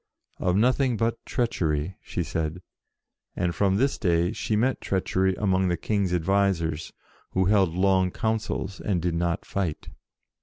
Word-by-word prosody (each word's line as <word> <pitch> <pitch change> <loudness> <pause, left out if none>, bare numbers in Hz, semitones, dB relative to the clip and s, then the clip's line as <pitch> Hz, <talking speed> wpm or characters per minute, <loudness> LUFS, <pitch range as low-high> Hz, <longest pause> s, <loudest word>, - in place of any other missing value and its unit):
" - - -42
Of 90 - +3
nothing 125 +3 +2
but 115 +1 -1
treachery," 85 -8 -1
she 90 - -3
said, 80 +2 -3 0.7
and, 90 -1 0
from 95 +3 +2
this 135 +6 +1
day, 85 -1 +2
she 110 -1 -2
met 125 +5 +1
treachery 95 0 0
among 95 -2 +1
the 90 -1 0
King's 100 -4 0
advisers, 90 -3 +1 0.4
who 95 0 +2
held 95 -4 +3
long 95 0 +3
councils, 110 -2 -2
and 95 -4 0
did 85 0 -1
not 85 0 -1
fight. 90 -6 -3
95 Hz, 150 wpm, -26 LUFS, 85-105 Hz, 0.7 s, Of